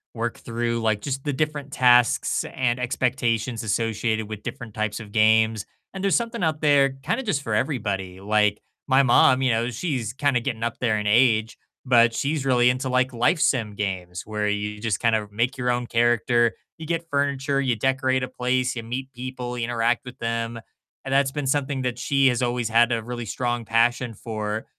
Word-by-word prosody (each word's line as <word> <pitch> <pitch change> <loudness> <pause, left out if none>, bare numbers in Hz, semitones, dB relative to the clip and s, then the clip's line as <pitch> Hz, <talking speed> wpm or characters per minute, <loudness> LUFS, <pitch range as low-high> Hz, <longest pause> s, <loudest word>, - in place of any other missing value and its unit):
work 115 0 -3
through, 115 0 -2
like, 110 -2 0
just 135 +1 -4
the 145 - -2
different 145 -1 -2
tasks 125 -2 +3
and 125 -1 0
expectations 120 -2 -1
associated 110 0 -1
with 105 -1 -7
different 115 -3 -7
types 110 0 -2
of 105 -2 -10
games. 110 0 +3 0.3
And 190 0 -6
there's 195 - +3
something 235 -3 -2
out 155 -2 0
there 140 -3 +4
kind - - -1
of 265 - -5
just 145 -8 0
for 110 - -3
everybody. 100 -8 -2
Like, 105 +1 +1 0.3
my 135 0 +4
mom, 130 +1 +5
you 125 - +3
know, 115 +2 0
she's 125 - -3
kind 140 0 0
of 120 - +1
getting 115 -4 -3
up 115 0 -3
there 115 -4 +1
in 105 - -3
age, 110 0 +3 0.3
but 120 -2 +5
she's 140 +3 -1
really 125 -2 +4
into, 130 +1 -3
like, 130 0 +1
Life 120 +8 +2
Sim 115 -8 +1
games 90 -3 -4
where 105 -1 -2
you 105 0 -2
just 110 -2 -1
kind 115 -2 +2
of 105 -1 -3
make 120 +6 -1
your 125 -1 -1
own 120 0 0
character. 120 0 +2 0.2
You 160 - -8
get 165 +1 -3
furniture, 140 -1 0
you 130 -3 +1
decorate 130 +2 0
a - - -2
place, 130 0 -1
you 115 - -4
meet 130 +4 -5
people, 125 0 -6
you 115 - -1
interact 120 0 0
with 125 0 -10
them. 115 0 -3 0.4
And 135 - -3
that's 135 0 +3
been 145 -1 -3
something 135 0 0
that 125 -1 -3
she 140 0 +2
has 125 -1 +1
always 120 -2 -1
had 120 +1 +4
a 115 - -2
really 120 0 -5
strong 120 +2 -2
passion 120 +1 +1
for. 110 0 -4
120 Hz, 200 wpm, -24 LUFS, 110-130 Hz, 0.4 s, mom